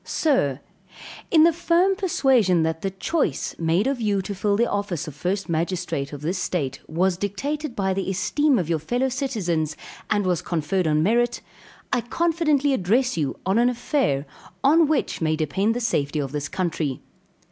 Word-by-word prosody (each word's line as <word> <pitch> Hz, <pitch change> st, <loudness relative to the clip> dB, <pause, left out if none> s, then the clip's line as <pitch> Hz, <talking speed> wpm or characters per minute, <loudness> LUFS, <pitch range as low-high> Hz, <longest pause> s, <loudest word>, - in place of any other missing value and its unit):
Sir 150 Hz, -, +1 dB, 0.7 s
In 315 Hz, -2 st, +6 dB
the 335 Hz, 0 st, +5 dB
firm 345 Hz, +3 st, +2 dB
persuasion 255 Hz, -, +2 dB
that 160 Hz, 0 st, -1 dB
the 195 Hz, -, -1 dB
choice 190 Hz, -, -1 dB
made 165 Hz, +5 st, +1 dB
of 270 Hz, -2 st, -1 dB
you 205 Hz, -3 st, +1 dB
to 200 Hz, -, -4 dB
fill 200 Hz, +1 st, 0 dB
the 235 Hz, +2 st, +2 dB
office 195 Hz, -5 st, -2 dB
of 155 Hz, -, -6 dB
first 185 Hz, +7 st, -2 dB
magistrate 165 Hz, -3 st, -2 dB
of 145 Hz, -1 st, -8 dB
this 175 Hz, +5 st, -2 dB
state, 140 Hz, -8 st, -2 dB
was 180 Hz, +3 st, +1 dB
dictated 270 Hz, -, -3 dB
by 190 Hz, -3 st, 0 dB
the 195 Hz, 0 st, -2 dB
esteem 260 Hz, +9 st, +2 dB
of 175 Hz, -, -1 dB
your 165 Hz, -1 st, 0 dB
fellow 245 Hz, -, 0 dB
citizens, 190 Hz, -, -2 dB, 0.3 s
and 205 Hz, -2 st, +1 dB
was 180 Hz, -3 st, +1 dB
conferred 170 Hz, +2 st, -1 dB
on 155 Hz, 0 st, +2 dB
merit, 240 Hz, +5 st, +1 dB, 0.5 s
I 250 Hz, -, +2 dB
confidently 305 Hz, 0 st, +1 dB
address 250 Hz, +4 st, +1 dB
you 150 Hz, -5 st, -2 dB
on 190 Hz, +4 st, +2 dB
an 240 Hz, +1 st, +4 dB
affair 245 Hz, -, 0 dB, 0.4 s
on 315 Hz, +3 st, +5 dB
which 300 Hz, -, -1 dB
may 155 Hz, -1 st, +1 dB
depend 190 Hz, +9 st, 0 dB
the -, -, -1 dB
safety 155 Hz, -11 st, -1 dB
of 140 Hz, -3 st, -2 dB
this 145 Hz, -1 st, -3 dB
country. 160 Hz, -7 st, -2 dB
195 Hz, 175 wpm, -23 LUFS, 160-260 Hz, 0.7 s, In